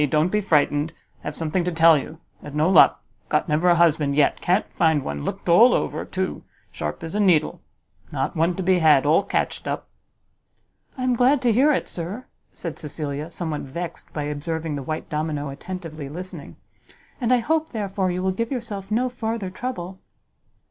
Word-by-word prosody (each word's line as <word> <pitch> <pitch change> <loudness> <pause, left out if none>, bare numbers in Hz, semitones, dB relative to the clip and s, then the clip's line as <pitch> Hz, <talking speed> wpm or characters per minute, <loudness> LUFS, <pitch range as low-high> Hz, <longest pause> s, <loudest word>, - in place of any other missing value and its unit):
don't 155 +4 +2
be 210 - +1
frightened. 150 -3 +2 0.3
Have 150 - -6
something 165 +2 -1
to 180 - -1
tell 165 0 +6
you; 155 +2 -4 0.2
had 145 0 -9
no 155 +2 +3
luck! 185 -3 +6 0.3
got 150 - +1
never 160 +4 +2
a 175 - +6
husband 155 -4 +3
yet! 145 -1 +2
can't 185 +5 +1
find 160 -4 +2
one! 70 0 -4
looked - - -5
all 225 +9 +7
over, - - -2
too; 190 0 -3 0.3
sharp 75 - -5
as 165 - -6
a 210 - -1
needle. 175 -7 +2 0.5
Not 135 0 -2
one 170 +2 +1
to 190 - -3
be 185 0 +3
had! 150 -4 +5
all 155 +6 +4
catched - - -2
up!" - - -3 1.1
"I 255 - -3
am 255 -1 +2
glad 255 +4 +4
to 240 -2 +4
hear 275 +7 +4
it, 290 - 0
sir," 185 +9 -5 0.3
said 165 -3 -7
Cecilia, 150 0 -4
somewhat 160 -3 -4
vexed 170 +5 -6
by 150 - -3
observing 155 +2 -3
the 140 - -4
white 155 +4 -4
domino 150 -1 -2
attentively 155 -1 -7
listening; 180 +5 -8 0.7
"and 240 0 +1
I 250 - +6
hope, 315 +7 0
therefore, 200 -4 -2
you 180 +1 -2
will 190 - +1
give 230 +6 -3
yourself 215 -6 -5
no 235 +4 +1
farther 225 -5 -3
trouble." 190 -5 -5
170 Hz, 185 wpm, -23 LUFS, 150-200 Hz, 1.1 s, all